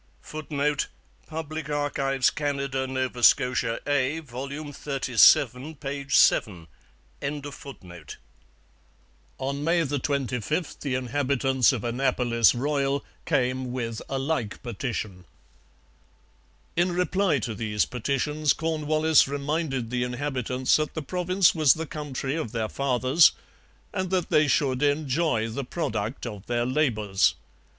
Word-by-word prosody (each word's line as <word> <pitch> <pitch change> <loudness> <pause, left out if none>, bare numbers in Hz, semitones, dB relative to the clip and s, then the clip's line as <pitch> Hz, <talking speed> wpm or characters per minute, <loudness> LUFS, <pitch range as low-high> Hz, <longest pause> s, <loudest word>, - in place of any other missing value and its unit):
[Footnote: 150 -1 -2 0.4
Public 155 -1 -5
Archives, 140 -2 +1
Canada. 140 -2 -2
Nova 130 -2 -3
Scotia 125 -2 +3
A, 145 +1 +1
vol. 130 -2 -7
xxxvii, 140 -1 +2
p. 140 -1 -5
7.] 90 - +3 2.7
On 140 +2 -3
May 165 +1 +2
25 140 - -2
the 135 -3 -1
inhabitants 130 0 +1
of 125 -6 -3
Annapolis 120 -2 +2
Royal 140 +1 0 0.2
came 130 0 0
with 115 -3 -4
a 135 - -1
like 135 -6 -2
petition. 110 -5 -4 1.5
In 175 +2 +2
reply 180 -1 +1
to 115 -2 -3
these 105 -1 0
petitions 140 +5 0
Cornwallis 155 -1 +2
reminded 140 -3 -2
the 125 0 0
inhabitants 125 0 0
that 155 -1 -3
the 160 - -3
province 180 +3 +2
was 155 -5 +5
the 160 0 -4
country 145 -3 -4
of 155 -10 -3
their 110 -2 -1
fathers, 135 +4 +4 0.6
and 185 -1 -2
that 185 -2 -1
they 150 0 +4
should 135 -2 +1
enjoy 145 -4 +1
the 115 +5 -4
product 125 -5 -3
of 105 -4 -7
their 120 0 0
labours. 115 -8 +1
135 Hz, 110 wpm, -26 LUFS, 125-150 Hz, 2.7 s, was